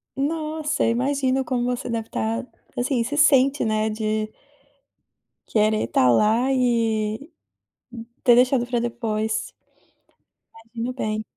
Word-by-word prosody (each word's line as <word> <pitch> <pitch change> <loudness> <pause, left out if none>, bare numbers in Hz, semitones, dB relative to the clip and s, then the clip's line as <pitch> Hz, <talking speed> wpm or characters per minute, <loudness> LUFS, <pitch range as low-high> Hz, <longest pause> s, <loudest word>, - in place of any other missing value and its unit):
Nossa! 305 +1 -1
Imagino 265 +2 +1
como 245 -2 -1
você 250 0 -3
deve 225 -1 -3
tá, 230 +3 -2 0.3
assim, 245 -1 0
se 290 +5 -4
sente, 275 -2 +4
né, 215 0 0
de 215 0 -2 1.2
querer 215 0 +2
tá 125 - +3
lá 225 - +3
e 230 +1 0 0.9
ter 240 - +7
deixado 250 0 +3
pra 240 -1 -1
depois. 220 -2 -2 1.0
Imagino 230 +2 -6
bem. 215 -3 -3
240 Hz, 110 wpm, -23 LUFS, 220-265 Hz, 1.2 s, ter